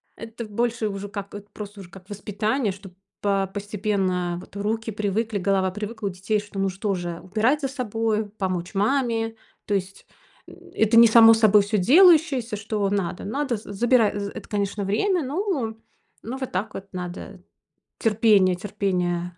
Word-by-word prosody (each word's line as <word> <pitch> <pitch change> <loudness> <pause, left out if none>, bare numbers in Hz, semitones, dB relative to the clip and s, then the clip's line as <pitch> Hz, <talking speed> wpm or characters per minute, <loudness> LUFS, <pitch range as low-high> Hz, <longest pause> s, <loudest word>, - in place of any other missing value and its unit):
Это 230 0 -8
больше 230 +1 -1
уже 195 0 -6
как 200 -1 -7
это 205 0 -10
просто 205 -1 -9
уже 175 - -12
как 190 +2 -15
воспитание, 210 +3 -1
чтоб 195 -1 -12 0.3
по 195 -1 +1
постепенно 195 -4 -1
вот 185 - -14
руки 220 +2 -2
привыкли, 210 +1 -1
голова 190 0 +1
привыкла 210 +1 -5
у - - 0
детей, 195 +4 -1
что, 205 -1 -8
ну, 195 0 +1
что 195 +2 -2
же, 175 -1 -5
убирать 225 +10 +1
за 270 - 0
собою, 225 -4 -2
помочь 185 -3 -3
маме. 225 0 0 0.3
То 205 - -2
есть, 195 0 -3 0.4
м, - - -12 0.2
это 220 +1 +2
не 235 0 +9
само 225 0 +8
собой 215 -2 +5
всё 210 +1 -1
делающееся, 285 - +5
что 205 -1 -2
надо 195 -3 -2
надо. 265 +1 -1
З 210 - -13
Забирай 225 -1 +2
з 200 0 -3
это, - - -9
конечно, 205 -1 -2
время, 340 - +1
но 280 - -2 0.5
ну, 250 +4 -5
вот 260 -1 -5
так 200 +4 -3
вот 195 +1 -8
надо. 180 0 -7 0.6
Терпение 210 -4 +3
терпение. 180 -3 -2
205 Hz, 165 wpm, -24 LUFS, 195-225 Hz, 0.6 s, не